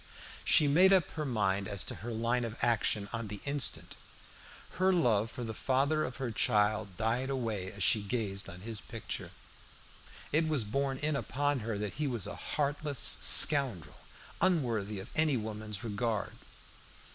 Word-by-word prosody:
She 150 - +5
made 180 +7 +5
up 185 -5 +4
her 155 -2 -4
mind 100 -5 0
as 100 -3 -1
to - - -4
her 120 - -6
line 115 +2 0
of 115 -1 -5
action 110 -3 +2
on 115 -1 -3
the 105 0 -7
instant. 140 -1 -1 0.9
Her 190 +1 +4
love 115 - +2
for 125 +1 -7
the 110 -1 -4
father 140 +6 +1
of 125 - -6
her 130 -3 -3
child 105 -4 +1
died 115 +5 -1
away 110 -8 -3
as 100 -2 -4
she 110 - +4
gazed 100 -2 -3
on 90 +1 -10
his 110 0 -4
picture. - - -6 1.0
It 155 +2 +2
was 150 -6 +1
borne 135 +5 -1
in 150 +2 -1
upon 145 +1 -1
her 110 -2 -3
that 105 -1 -4
he 150 - +1
was 120 -7 -2
a - - -6
heartless 145 -1 -2 0.2
scoundrel, 120 - +4 0.4
unworthy 115 - 0
of 95 - -10
any 155 -4 +2
woman's 105 -2 -6
regard. 110 -1 -2
115 Hz, 165 wpm, -31 LUFS, 105-140 Hz, 1.0 s, She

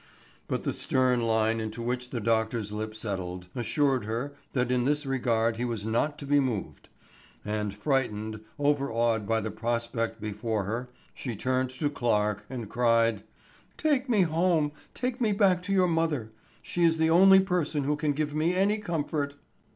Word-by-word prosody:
But - - -2
the - - -1
stern 130 -2 +2
line 110 0 +2
into 110 +1 -5
which 125 +1 -2
the 125 - -3
doctor's 110 -1 0
lip 110 +1 -4
settled, 90 -4 -5
assured 130 0 +1
her 120 +6 -3 0.2
that 125 -2 0
in 125 -1 +2
this 145 +1 +1
regard 115 -4 +1
he 120 - -2
was 115 -4 -3
not 130 +7 0
to 145 - -7
be 145 +1 +4
moved; 125 -7 -3 0.6
and 105 -1 -2
frightened, 110 -2 -1 0.2
overawed 120 -7 +1
by 115 0 +1
the 110 0 -3
prospect 115 -1 -2
before 105 0 -2
her, 115 +5 -4 0.2
she 125 -4 -5
turned 130 +4 0
to 130 +4 -2
Clarke 105 -6 0
and 120 -4 -5
cried: 115 -2 +2 0.6
"Take 280 -4 +1
me 215 -5 +4
home, 165 -2 +2 0.2
take 250 0 -3
me 215 -3 +3
back 195 -3 +3
to 190 +2 -5
your 185 -2 +4
mother; 160 -9 0 0.3
she 175 - -1
is 165 -1 +4
the 160 0 +2
only 190 +3 +8
person 175 -6 0
who 150 +2 +1
can 150 0 0
give 150 0 -2
me 160 +4 +1
any 200 +3 +2
comfort." 150 -6 -2
125 Hz, 170 wpm, -28 LUFS, 110-155 Hz, 0.6 s, only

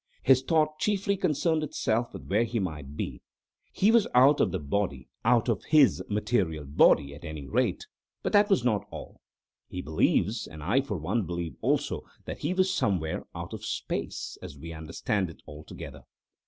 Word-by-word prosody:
His 130 -1 +5
thought 155 +1 +1
chiefly 200 -1 +1
concerned 165 -3 +1
itself 120 -5 -1
with - - -9
where 105 +4 +2
he 120 0 -2
might 75 -7 -4
be. - - -4 0.5
He 205 +3 +3
was 230 -2 +4
out 135 +4 +6
of - - +3
the 95 - -1
body—out 90 - 0
of 115 -6 0
his 150 -4 +5
material 100 -8 0
body, 70 0 +4
at 75 - -12
any 80 -4 -6
rate—but - - -3
that 205 0 +5
was 195 - +3
not 110 -5 0
all. - - -10 0.5
He 90 - -6
believes, 105 +7 +1
and 80 -1 -10
I 115 - +3
for 115 -8 -4
one 95 +5 -1
believe 85 -4 -4
also, - - 0 0.2
that - - -6
he 150 - -1
was 185 0 +2
somewhere 90 - -1
out - - -6
of - - -7
space, - - -4
as 70 - -9
we 80 +3 -8
understand 85 +4 -2
it, 80 - -14
altogether. 75 +1 -9
105 Hz, 170 wpm, -28 LUFS, -, 0.5 s, out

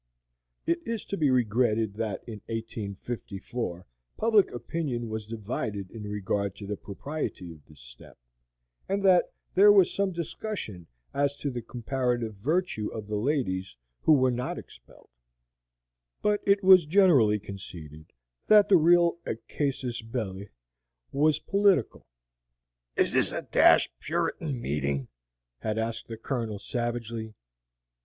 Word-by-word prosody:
It 170 0 +1
is 230 -2 -4
to - - -3
be 155 -6 +2
regretted 115 -3 +2
that 110 -1 -3
in 110 -4 -8
1854 110 -2 -5 0.3
public 220 -3 +4
opinion 120 -1 -3
was 110 -1 -5
divided 105 -3 -4
in 110 -2 -8
regard 100 -1 -2
to 100 - -9
the 105 +1 -3
propriety 100 - -5
of 80 -3 -14
this 75 -4 -17
step, - - -15 0.7
and 195 +1 0
that 185 -2 +5 0.2
there 205 +2 +8
was 195 -3 +5
some 200 -1 0
discussion 170 - -5 0.3
as 140 0 +1
to 140 0 -3
the 120 -1 -4
comparative 120 -1 -2
virtue 135 - -1
of 110 -2 -6
the 105 +1 -4
ladies 105 - -1 0.2
who 160 - +5
were 130 -3 +4
not 125 +1 -3
expelled; - - -14 1.1
but 210 -1 +2
it 200 0 +4
was 185 -4 +7
generally 150 - +5
conceded 80 -6 -10 0.4
that 210 -1 +6
the 190 - +7
real 170 +1 +4 0.3
casus 135 -5 -2
belli 105 -4 -5 0.6
was 150 +2 +3
political. 200 - +1 0.9
"Is - - +2
this - - +3
a - - -4
dashed - - +5
Puritan 140 - -2
meeting?" 70 - -2 0.5
had 110 - -2
asked 115 0 -3
the 115 - -7
Colonel, 115 -3 -3
savagely. 115 0 -4
120 Hz, 130 wpm, -28 LUFS, 105-155 Hz, 1.1 s, there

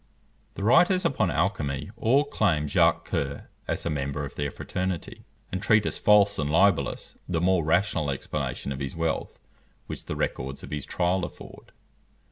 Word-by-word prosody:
The 100 - -5
writers 180 - +4
upon 120 - +2
alchymy 80 -3 -1
all 120 +5 +3
claim 100 - +1
Jacques - - +3
Coeur 70 0 -3 0.2
as - - -2
a - - 0
member 70 0 -2
of 70 - -9
their 70 0 -2
fraternity, 90 +4 -4 0.3
and 95 - -3
treat 110 0 +4
as - - -2
false 100 -1 +5
and 75 -1 0
libellous 85 -4 +1
the 85 -2 0
more 90 0 +2
rational 85 -1 +1
explanation 70 0 -3
of 65 - -4
his 70 +1 -4
wealth 80 -1 -2 0.5
which - - -7
the - - -4
records 65 +1 -3
of - - -9
his 75 -2 -4
trial 90 +1 0
afford. - - -9
85 Hz, 165 wpm, -26 LUFS, 70-100 Hz, 0.5 s, false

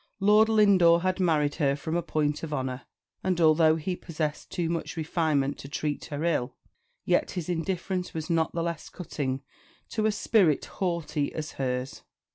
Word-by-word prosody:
Lord 210 +2 +5
Lindore 190 -6 +5
had 185 0 0
married 155 -5 +2
her 140 -1 +3
from 160 +3 -4
a 175 - +1
point 150 -2 -1
of 165 - -5
honour; 130 -3 -3 0.4
and 185 -2 0
although 160 -1 +5
he 170 +3 -3
possessed 155 -4 -4
too 170 -2 -2
much 165 +1 -3
refinement 155 -3 0
to 135 - -9
treat 150 0 -3
her 150 0 -4
ill, 150 -7 0 0.5
yet - - +2
his 170 - -3
indifference 180 +1 -2
was 160 -1 -5
not 165 -2 +1
the 165 - 0
less 170 -2 -4
cutting 135 -6 -4 0.5
to 215 -1 0
a - - +2
spirit 205 -7 +2
haughty 170 -5 -2
as 155 -1 -4
hers. 125 0 -3
160 Hz, 170 wpm, -27 LUFS, 150-180 Hz, 0.5 s, Lord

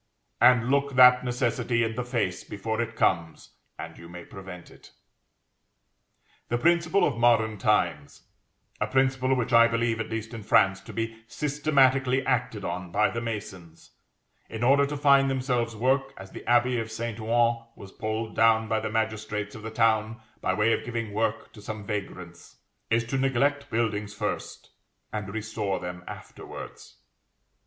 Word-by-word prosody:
And 125 -1 +5
look 140 -1 +1
that 125 0 +7
necessity 120 -1 0
in 115 0 -1
the 125 +2 -3
face 120 -7 -2
before 110 +3 -3
it 115 -1 -4
comes, 85 -6 -1 0.3
and - - -8
you 85 - -12
may 85 0 -10
prevent 95 -2 -11
it. - - -18 1.6
The 120 - +1
principle 170 +6 +3
of 115 -5 -2
modern 110 -3 +3
times 85 -9 0 0.6
(a - - 0
principle 130 0 +1
which 125 -1 -2
I 115 0 +7
believe, 115 -1 0
at 110 - -4
least 110 +1 -5
in 115 - -6
France, 95 -2 +3
to - - -9
be 115 0 -4
systematically 135 -3 +2
acted 120 -5 -1
on 90 -1 -5
by 105 - +2
the 115 - -3
masons, 95 -7 -7 0.6
in 115 +1 -5
order 140 +3 +4
to 145 +1 -4
find 140 -1 +4
themselves 125 -3 -1
work, 135 +4 0
as 95 0 -11
the - - -8
abbey 120 0 +3
of 115 0 -4
St. 115 0 -5
Ouen 115 +1 +1
was 95 - -12
pulled 110 +1 -4
down 110 0 +4
by 110 0 0
the 110 - -4
magistrates 110 -1 -2
of 110 - -9
the 110 - -6
town 110 0 +1 0.2
by - - 0
way 110 +2 +3
of - - -2
giving 115 -2 -4
work 110 +1 -2
to 105 - -13
some 105 0 -7
vagrants,) 90 -4 -7 0.3
is 115 0 +2
to 130 +4 -2
neglect 140 +2 +1
buildings 105 -2 -2
first, - - -5 0.4
and 105 -2 -4
restore 110 -2 -3
them 90 0 -7
afterwards. - - -10
115 Hz, 165 wpm, -26 LUFS, 105-125 Hz, 1.6 s, that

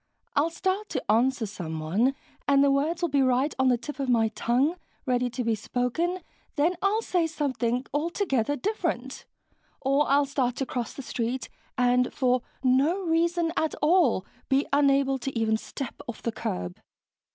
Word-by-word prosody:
I'll 300 +3 +3
start 380 +5 -2
to - - -1
answer 245 +2 +2
someone 180 - -1 0.3
and 280 0 +5
the 280 - +4
words 315 +5 0
will 345 - +2
be 280 -1 +2
right 260 +3 +2
on 265 - +4
the 250 -1 +4
tip 280 +5 -8
of 270 -2 -1
my 225 -2 +3
tongue, 255 +9 +1 0.3
ready 250 -2 +1
to 245 +1 -3
be 230 -1 +1
spoken, 250 - -1 0.3
then 325 +5 +2
I'll 420 +3 +2
say 350 -5 +1
something 260 -6 -1
altogether 290 - 0
different. 315 - -3 0.5
Or 275 +2 +2
I'll 285 +1 +4
start 260 -3 -1
to 270 - -2
cross 245 -2 -4
the 275 - -8
street 245 +1 -3 0.3
and, 250 0 +3
for 255 -2 +1 0.2
no 280 +9 +3
reason 335 0 +1
at 315 - 0
all, 300 - +4 0.2
be 275 +1 +3
unable 275 -1 +3
to 265 0 -4
even 220 -1 +2
step 250 +3 -6
off 235 - -7
the 230 - 0
curb...." 90 - -4
270 Hz, 165 wpm, -27 LUFS, 245-315 Hz, 0.5 s, and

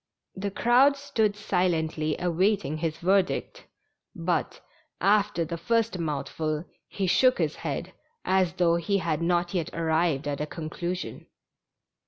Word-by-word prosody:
The 195 +1 -3
crowd 250 +7 +4
stood 220 -7 0
silently 160 -6 0
awaiting 180 -1 +1
his 160 0 -2
verdict, 195 - 0 0.5
but, - - -1 0.4
after 200 -4 +2
the 170 +1 -5
first 230 0 0
mouthful, 155 +1 -2 0.2
he 195 - -3
shook 255 +7 +4
his - - -1
head, - - -4 0.3
as 185 -2 +2
though 170 -1 +3
he 185 +4 0
had 165 -4 -1
not 175 +1 +1
yet 170 -4 -1
arrived 160 -3 +1
at 145 0 -2
a 150 - -2
conclusion. 175 +3 -5
175 Hz, 130 wpm, -27 LUFS, 160-200 Hz, 0.5 s, crowd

